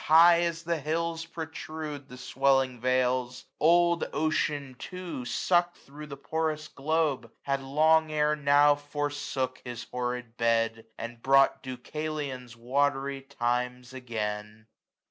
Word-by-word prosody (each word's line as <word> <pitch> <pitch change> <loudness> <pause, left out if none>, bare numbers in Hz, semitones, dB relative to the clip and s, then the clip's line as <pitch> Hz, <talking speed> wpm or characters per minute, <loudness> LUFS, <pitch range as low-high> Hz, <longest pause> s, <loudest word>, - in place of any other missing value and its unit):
High 170 +2 +7
as 170 -1 -1
the 170 -1 -1
hills 165 +2 -2
protrude 155 -3 -6
the 125 - -10
swelling 135 0 +1
vales: 125 0 0
Old 170 +1 +4
Ocean 150 -3 0
too, 180 -8 -6
suck'd 175 +7 +1
thro' 150 +2 -11
the 140 -1 -8
porous 155 +1 -2
globe. 150 -4 -1
Had 140 0 -1
long 155 +3 +3
ere 150 0 +2
now 145 0 +5
forsook 145 -3 -3
his 120 -1 -6
horrid 125 -1 -4
bed. 115 -1 +1
And 115 0 -7
brought 135 +1 +4
Deucalion's 130 -2 -5
watry 135 +2 0
times 125 -1 -2
again. 110 -3 -5
140 Hz, 120 wpm, -28 LUFS, 125-155 Hz, -, High